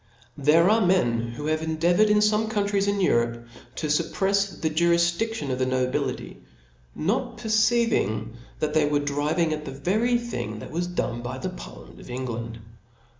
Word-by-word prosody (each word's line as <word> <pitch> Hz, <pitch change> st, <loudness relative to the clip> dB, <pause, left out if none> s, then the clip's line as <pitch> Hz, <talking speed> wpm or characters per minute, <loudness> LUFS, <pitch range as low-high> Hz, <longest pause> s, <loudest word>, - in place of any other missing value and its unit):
There 155 Hz, +5 st, +5 dB
are 220 Hz, +2 st, +4 dB
men 120 Hz, -11 st, +1 dB
who 145 Hz, +5 st, -6 dB
have 155 Hz, 0 st, 0 dB
endeavoured 170 Hz, +6 st, +2 dB
in 210 Hz, -, +4 dB
fome 215 Hz, +1 st, +1 dB
countries 200 Hz, -2 st, 0 dB
in 200 Hz, 0 st, +1 dB
Europe 120 Hz, -7 st, +1 dB, 0.3 s
to -, -, -3 dB
fupprefs 195 Hz, +6 st, 0 dB
the 160 Hz, -, -1 dB
jqrifdidlion 170 Hz, +1 st, +1 dB
of 125 Hz, -, -2 dB
the, 130 Hz, -, +2 dB
nobility; 130 Hz, 0 st, -2 dB, 0.6 s
not 230 Hz, +6 st, -1 dB
perceiving 220 Hz, -, +1 dB, 0.2 s
that 150 Hz, -1 st, -2 dB
they 155 Hz, -1 st, +3 dB
were 145 Hz, -, +2 dB
driving 150 Hz, +3 st, 0 dB
at 150 Hz, 0 st, -5 dB
the -, -, -5 dB
very 210 Hz, -, +1 dB
thing 235 Hz, -, -5 dB
that 105 Hz, -, -9 dB
was 175 Hz, +2 st, -2 dB
done 120 Hz, -9 st, -3 dB
by 125 Hz, +2 st, -5 dB
the 185 Hz, -, -4 dB
parliament 180 Hz, -, -11 dB
of -, -, -13 dB
England. 120 Hz, -2 st, -5 dB
160 Hz, 165 wpm, -25 LUFS, 130-200 Hz, 0.6 s, There